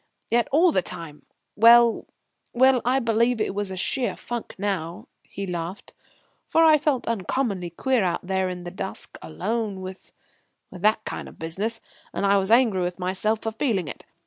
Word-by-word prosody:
Yet 235 Hz, 0 st, +3 dB
all 330 Hz, +5 st, +5 dB
the 185 Hz, -, +2 dB
time 165 Hz, -3 st, -8 dB, 0.3 s
well, 235 Hz, +1 st, +6 dB, 0.5 s
well, 255 Hz, 0 st, +4 dB
I 250 Hz, +2 st, +2 dB
believe 235 Hz, -1 st, +1 dB
it 215 Hz, -, -1 dB
was 195 Hz, -2 st, -3 dB
sheer 245 Hz, +7 st, -1 dB
funk 240 Hz, -1 st, -6 dB
now," 185 Hz, -4 st, -3 dB
he 200 Hz, -, -7 dB
laughed; 175 Hz, +1 st, -6 dB, 0.6 s
"for 325 Hz, -, +4 dB
I 310 Hz, -1 st, +6 dB
felt 280 Hz, -4 st, 0 dB
uncommonly 205 Hz, -3 st, -1 dB
queer 250 Hz, +6 st, 0 dB
out 180 Hz, 0 st, -1 dB
there 190 Hz, 0 st, 0 dB
in 180 Hz, -1 st, -6 dB
the 175 Hz, -, -6 dB
dusk, 190 Hz, +1 st, -6 dB
alone 205 Hz, +4 st, -3 dB
with 185 Hz, 0 st, -9 dB, 0.6 s
with 180 Hz, -, -10 dB
that 215 Hz, +2 st, +2 dB
kind -, -, -5 dB
of -, -, -16 dB
business; 200 Hz, +8 st, -3 dB, 0.3 s
and -, -, 0 dB
I 200 Hz, 0 st, +4 dB
was 190 Hz, 0 st, 0 dB
angry 230 Hz, -5 st, +4 dB
with 175 Hz, 0 st, -2 dB
myself 190 Hz, +4 st, 0 dB
for 225 Hz, -, -2 dB
feeling 220 Hz, -, -1 dB
it. -, -, -9 dB
205 Hz, 175 wpm, -24 LUFS, 185-235 Hz, 0.6 s, well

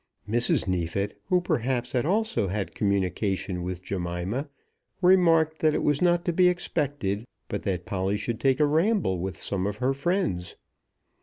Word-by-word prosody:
Mrs. 115 Hz, -2 st, +1 dB
Neefit, 95 Hz, +3 st, -2 dB
who 180 Hz, -1 st, +2 dB
perhaps 125 Hz, -6 st, -1 dB
had 125 Hz, +2 st, 0 dB
also 215 Hz, -, +1 dB
had 100 Hz, +1 st, -3 dB
communication 95 Hz, -2 st, -1 dB
with 90 Hz, 0 st, -5 dB
Jemima, 95 Hz, -, -3 dB, 0.5 s
remarked 165 Hz, -4 st, +4 dB
that 155 Hz, -1 st, +3 dB
it -, -, 0 dB
was 145 Hz, -1 st, +2 dB
not 175 Hz, -1 st, +3 dB
to 175 Hz, -, +1 dB
be 180 Hz, +1 st, +5 dB
expected, 145 Hz, -, -1 dB, 0.2 s
but -, -, -3 dB
that 90 Hz, -3 st, -2 dB
Polly 95 Hz, 0 st, -1 dB
should 110 Hz, +2 st, -3 dB
take 130 Hz, +2 st, +2 dB
a 150 Hz, -, +5 dB
ramble 160 Hz, -, +2 dB
with 95 Hz, +2 st, -4 dB
some 100 Hz, -1 st, -2 dB
of 105 Hz, 0 st, -3 dB
her 130 Hz, +4 st, +1 dB
friends. 140 Hz, -, -1 dB
120 Hz, 160 wpm, -26 LUFS, 95-160 Hz, 0.5 s, be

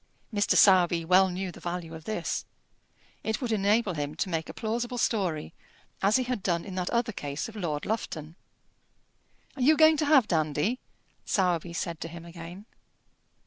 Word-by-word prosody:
Mr. 205 Hz, -1 st, +2 dB
Sowerby 175 Hz, -4 st, +5 dB
well 185 Hz, +2 st, +5 dB
knew 185 Hz, +1 st, -4 dB
the -, -, -13 dB
value 175 Hz, -1 st, -5 dB
of 160 Hz, 0 st, -10 dB
this. 215 Hz, -, -2 dB, 0.8 s
It 220 Hz, 0 st, -1 dB
would 245 Hz, -3 st, -3 dB
enable 205 Hz, -1 st, +2 dB
him 145 Hz, -1 st, -4 dB
to 185 Hz, -, -2 dB
make 165 Hz, -2 st, -2 dB
a -, -, -6 dB
plausible 240 Hz, +2 st, -2 dB
story, 180 Hz, -9 st, -1 dB, 0.5 s
as 200 Hz, +3 st, +3 dB
he 260 Hz, -, +3 dB
had 250 Hz, -4 st, -3 dB
done 170 Hz, -3 st, -1 dB
in 195 Hz, -, -7 dB
that 185 Hz, -1 st, -2 dB
other 235 Hz, -1 st, 0 dB
case 145 Hz, -6 st, -4 dB
of 225 Hz, -, -11 dB
Lord 160 Hz, -8 st, -3 dB
Lufton. 165 Hz, -7 st, -4 dB, 1.2 s
"Are 270 Hz, -, -6 dB
you 300 Hz, +5 st, +5 dB
going 315 Hz, 0 st, +6 dB
to 300 Hz, -, +1 dB
have 280 Hz, -6 st, +5 dB
Dandy?" 160 Hz, -, 0 dB, 0.4 s
Sowerby 175 Hz, -3 st, 0 dB
said 170 Hz, -1 st, -4 dB
to -, -, -3 dB
him 170 Hz, 0 st, -10 dB
again. 170 Hz, +3 st, -10 dB
185 Hz, 175 wpm, -28 LUFS, 165-220 Hz, 1.2 s, going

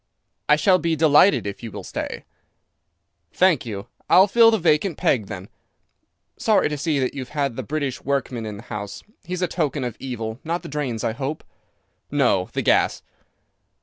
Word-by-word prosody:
"I 150 Hz, -, +7 dB
shall 185 Hz, +4 st, +3 dB
be 165 Hz, 0 st, 0 dB
delighted 155 Hz, -, +5 dB
if 100 Hz, -1 st, -5 dB
you 115 Hz, -2 st, -7 dB
will -, -, -7 dB
stay." -, -, -5 dB, 1.1 s
"Thank 180 Hz, -9 st, +3 dB
you. 100 Hz, -3 st, -5 dB, 0.2 s
I'll 185 Hz, -, +7 dB
fill 230 Hz, +3 st, +6 dB
the 225 Hz, -, +3 dB
vacant 165 Hz, -1 st, +1 dB
peg 110 Hz, -7 st, +1 dB
then. 95 Hz, +1 st, -7 dB, 0.9 s
Sorry -, -, +2 dB
to 150 Hz, -, -3 dB
see 155 Hz, 0 st, 0 dB
that 130 Hz, -2 st, 0 dB
you've 130 Hz, -3 st, -6 dB
had 140 Hz, -4 st, 0 dB
the 130 Hz, -, -3 dB
British 140 Hz, 0 st, -3 dB
workman 130 Hz, -4 st, -2 dB
in 105 Hz, -1 st, -6 dB
the 105 Hz, -, -11 dB
house. 105 Hz, -4 st, -7 dB, 0.2 s
He's 180 Hz, +1 st, -3 dB
a -, -, +2 dB
token 150 Hz, -5 st, -1 dB
of 120 Hz, -3 st, -4 dB
evil. 115 Hz, -3 st, -5 dB
Not 170 Hz, +2 st, -3 dB
the -, -, -8 dB
drains, 135 Hz, -6 st, -3 dB
I -, -, 0 dB
hope?" 140 Hz, +5 st, -4 dB, 0.7 s
"No, 125 Hz, -10 st, +2 dB
the -, -, -1 dB
gas." -, -, +2 dB
140 Hz, 180 wpm, -23 LUFS, 115-160 Hz, 1.1 s, I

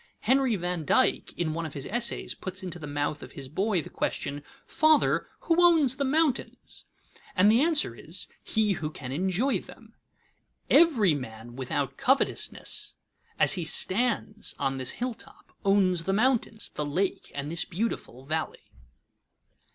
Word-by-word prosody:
Henry 260 Hz, 0 st, +3 dB
van 175 Hz, -2 st, -3 dB
Dyke -, -, +2 dB
in 160 Hz, -3 st, -1 dB
one 165 Hz, +1 st, -3 dB
of 150 Hz, -, -11 dB
his 140 Hz, -1 st, -5 dB
essays 235 Hz, +2 st, -1 dB
puts 185 Hz, 0 st, -7 dB
into 175 Hz, -2 st, -5 dB
the 150 Hz, -, -7 dB
mouth 145 Hz, +1 st, -2 dB
of -, -, -10 dB
his 135 Hz, -2 st, -7 dB
boy 190 Hz, +4 st, 0 dB
the -, -, -10 dB
question, 145 Hz, 0 st, -3 dB, 0.2 s
"Father, 310 Hz, -1 st, +3 dB
who 340 Hz, +1 st, +3 dB
owns 310 Hz, -7 st, +5 dB
the 280 Hz, -, 0 dB
mountains?" 290 Hz, 0 st, -1 dB, 0.5 s
and 200 Hz, +3 st, +5 dB
the 230 Hz, +4 st, +4 dB
answer 310 Hz, -, +2 dB
is, 165 Hz, +9 st, -5 dB, 0.2 s
He 215 Hz, -2 st, +1 dB
who 155 Hz, -5 st, -2 dB
can 130 Hz, -4 st, -8 dB
enjoy 190 Hz, -, 0 dB
them. -, -, -15 dB, 0.8 s
Every 235 Hz, -, +5 dB
man 120 Hz, -3 st, -7 dB
without 135 Hz, +1 st, -3 dB
covetousness, 270 Hz, 0 st, 0 dB, 0.4 s
as -, -, +7 dB
he 180 Hz, -4 st, -2 dB
stands 215 Hz, +5 st, 0 dB
on 135 Hz, -1 st, -1 dB
this 130 Hz, -1 st, 0 dB
hilltop, 245 Hz, -1 st, -7 dB
owns 185 Hz, -4 st, +3 dB
the 195 Hz, -, 0 dB
mountains, 230 Hz, 0 st, +1 dB
the 150 Hz, -, -3 dB
lake, 180 Hz, +7 st, -2 dB
and 140 Hz, +2 st, -4 dB
this 170 Hz, -, 0 dB
beautiful 170 Hz, -, -4 dB
valley. 160 Hz, +2 st, -4 dB
185 Hz, 150 wpm, -27 LUFS, 150-240 Hz, 0.8 s, as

